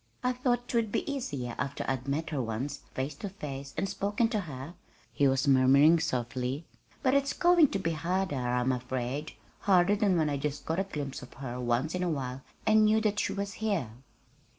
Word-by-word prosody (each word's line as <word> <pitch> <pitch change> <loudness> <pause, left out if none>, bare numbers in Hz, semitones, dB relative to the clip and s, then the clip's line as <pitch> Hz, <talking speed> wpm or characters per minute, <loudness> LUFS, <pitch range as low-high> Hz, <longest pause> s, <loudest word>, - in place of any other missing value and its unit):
"I 250 0 +2
thought 245 -1 0
'twould 230 -3 0
be - - -1
easier 145 - -3
after 140 - -2
I'd 130 0 -2
met 155 +3 -1
her 145 -4 0
once, 125 +5 -3 0.2
face 135 +3 -2
to 205 - -5
face, 140 -7 -7
and 195 - 0
spoken 205 +4 0
to 220 -3 0
her," 145 -3 -7 0.4
he 140 - +3
was 135 +2 +1
murmuring 140 +5 +6
softly; 130 0 -2 0.4
"but 260 - +3
it's 280 0 +2
going 345 -3 +5
to 200 - -2
be 165 -4 -1
harder, 175 +2 -1
I'm 125 0 +1
afraid 130 +3 -3 0.3
harder 190 0 +4
than 200 -4 +2
when 160 -2 +2
I 145 -1 0
just 145 +1 -3
caught 160 +3 -1
a 195 - 0
glimpse 145 -7 -5
of - - -12
her 125 -2 -5
once 125 +5 0
in 180 - -2
a 180 - +1
while 135 -4 -3 0.2
and 215 0 +5
knew 215 +1 +4
that 210 -1 +1
she - - 0
was 200 0 -3
here." 195 - 0
155 Hz, 200 wpm, -30 LUFS, 130-200 Hz, 0.4 s, murmuring